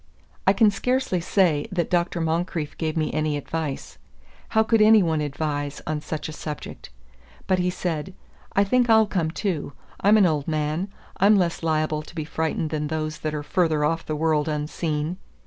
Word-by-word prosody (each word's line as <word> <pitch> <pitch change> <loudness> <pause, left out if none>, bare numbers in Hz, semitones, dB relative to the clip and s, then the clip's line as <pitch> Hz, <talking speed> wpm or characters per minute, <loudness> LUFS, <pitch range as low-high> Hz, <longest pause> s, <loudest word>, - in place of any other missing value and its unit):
I 195 - +7
can 215 -1 +5
scarcely 250 -4 0
say 170 -4 +2
that 175 -3 -1
Dr. 175 -1 +1
Moncrieff 165 -1 -2
gave 160 -1 -1
me 155 -1 0
any 155 -1 0
advice. 150 -1 -5 0.5
How 220 - +3
could 220 0 +3
any 215 -1 +7
one 160 -3 0
advise 145 -1 -3
on 155 -1 -2
such 155 0 -4
a - - -6
subject? 150 - -7 0.6
But 185 -1 +2
he 180 0 +1
said, 180 0 -3 0.4
"I 200 - +4
think 245 +4 +2
I'll 220 -1 +6
come 180 -6 -1
too. 165 -5 -3 0.3
I'm 210 +2 +5
an 205 - +6
old 150 -4 0
man; 155 +4 -1 0.3
I'm 205 +3 +5
less 175 -4 +1
liable 155 -1 0
to 155 - -14
be 155 -3 -3
frightened 160 0 -2
than 150 -1 -1
those 155 0 -3
that 155 -1 -3
are 150 - -3
further 155 -3 +1
off 165 +2 0
the 155 - -3
world 155 -1 +1
unseen. 150 +2 -2
160 Hz, 180 wpm, -24 LUFS, 150-185 Hz, 0.6 s, I